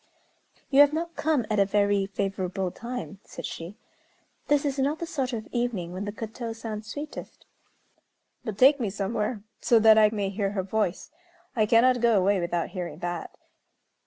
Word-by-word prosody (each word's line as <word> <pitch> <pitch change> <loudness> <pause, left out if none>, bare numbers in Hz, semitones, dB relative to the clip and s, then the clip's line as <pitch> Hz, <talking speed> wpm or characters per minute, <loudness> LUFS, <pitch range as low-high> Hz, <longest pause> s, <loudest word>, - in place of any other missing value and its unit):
"You 275 - +5
have 290 0 +6
not 335 +2 -3
come 300 -7 +1
at 210 - +2
a - - +7
very 200 -1 +2
favorable 195 -1 -2
time," 235 -3 -6
said - - -8
she. 170 +6 -7 0.7
"This 290 0 +2
is 280 -1 -1
not 285 +4 +1
the 335 - -4
sort 275 -6 -2
of 225 -3 -4
evening 230 -8 -2
when 190 +2 -4
the 205 - -3
koto 225 +2 -6
sounds 220 -1 -6
sweetest." 295 +1 -8 1.0
"But 215 -4 -5
take 275 +5 +6
me 225 -5 -1
somewhere, 210 +2 -2 0.2
so 235 - +4
that 220 0 +7
I 215 -1 +6
may 205 -3 -1
hear 200 0 -2
her 190 -2 -1
voice. 195 - -2 0.4
I 215 -3 +2
cannot 240 +2 +4
go 235 -3 +4
away 195 +1 +3
without 170 -1 -1
hearing 180 -3 -5
that." 175 -1 -5
215 Hz, 175 wpm, -27 LUFS, 195-245 Hz, 1.0 s, a